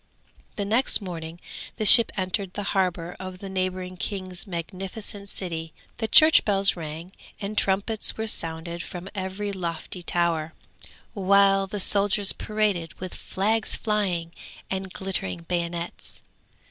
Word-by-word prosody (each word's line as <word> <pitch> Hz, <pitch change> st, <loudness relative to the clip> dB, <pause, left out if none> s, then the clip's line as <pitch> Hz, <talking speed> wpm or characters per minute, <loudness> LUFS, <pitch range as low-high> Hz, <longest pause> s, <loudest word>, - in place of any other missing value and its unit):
The 205 Hz, -, -3 dB
next 230 Hz, +6 st, +2 dB
morning 170 Hz, -4 st, -7 dB, 0.4 s
the 215 Hz, -, -2 dB
ship 230 Hz, +2 st, +10 dB
entered 185 Hz, 0 st, -2 dB
the 205 Hz, -, -3 dB
harbour 180 Hz, -3 st, -1 dB
of 185 Hz, 0 st, -7 dB
the 195 Hz, +1 st, -8 dB
neighbouring 185 Hz, -1 st, -3 dB
king's 185 Hz, 0 st, -4 dB
magnificent 195 Hz, +4 st, -6 dB
city. 165 Hz, -4 st, -5 dB, 0.2 s
The 220 Hz, -, -1 dB
church 310 Hz, +6 st, +7 dB
bells 195 Hz, -2 st, +4 dB
rang 165 Hz, +1 st, -7 dB, 0.3 s
and 205 Hz, +1 st, -5 dB
trumpets 200 Hz, +2 st, 0 dB
were 220 Hz, -, -2 dB
sounded 170 Hz, -4 st, -3 dB
from 180 Hz, +2 st, -8 dB
every 195 Hz, +1 st, -4 dB
lofty 175 Hz, -1 st, -5 dB
tower, 170 Hz, -2 st, -1 dB, 0.6 s
while 195 Hz, -1 st, +3 dB
the 205 Hz, +1 st, -4 dB
soldiers 200 Hz, 0 st, +4 dB
paraded 205 Hz, -6 st, -1 dB
with 185 Hz, -1 st, -6 dB
flags 215 Hz, +3 st, 0 dB
flying 190 Hz, -6 st, -1 dB, 0.4 s
and 190 Hz, 0 st, -3 dB
glittering 95 Hz, -, -4 dB
bayonets. 170 Hz, -, -4 dB
190 Hz, 130 wpm, -25 LUFS, 170-200 Hz, 0.6 s, ship